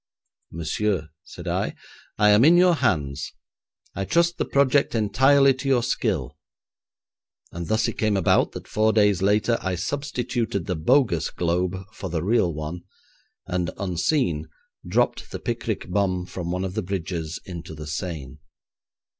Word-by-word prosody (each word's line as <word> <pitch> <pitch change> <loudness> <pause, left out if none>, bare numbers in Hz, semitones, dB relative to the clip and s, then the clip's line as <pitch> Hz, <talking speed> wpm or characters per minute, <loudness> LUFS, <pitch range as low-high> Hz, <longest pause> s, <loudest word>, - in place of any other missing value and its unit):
'Monsieur,' 85 +1 -1
said - - -10
I, - - -1 0.4
'I 105 0 +5
am 105 +3 +6
in 165 +4 +7
your 180 0 +6
hands. 70 - -1 0.6
I 100 - -3
trust 170 - +1
the - - +1
project 140 -1 +2
entirely 135 +6 +4
to 130 +2 -6
your 130 -3 +3
skill,' 85 - -1 1.1
and 85 0 -6
thus 110 +1 +1
it - - -5
came 110 -2 +2
about 95 - +2
that - - -8
four 110 +1 +2
days 105 -4 +3
later 105 +4 +2
I 95 -1 -1
substituted 120 - -2
the 90 - -2
bogus 95 - +2
globe 90 +2 -1 0.2
for 95 - -6
the 80 -2 -2
real 105 -3 +2
one, 75 +3 -5 0.6
and, 90 -2 -1
unseen, 90 - 0 0.4
dropped - - 0
the - - -5
picric - - -3
bomb 90 -1 0
from 90 -1 -6
one 90 +1 -2
of 95 - -4
the 110 - -1
bridges 85 -4 -4
into 85 -3 -8
the 75 0 -8
Seine. 75 -4 -5
95 Hz, 150 wpm, -24 LUFS, 85-115 Hz, 1.1 s, in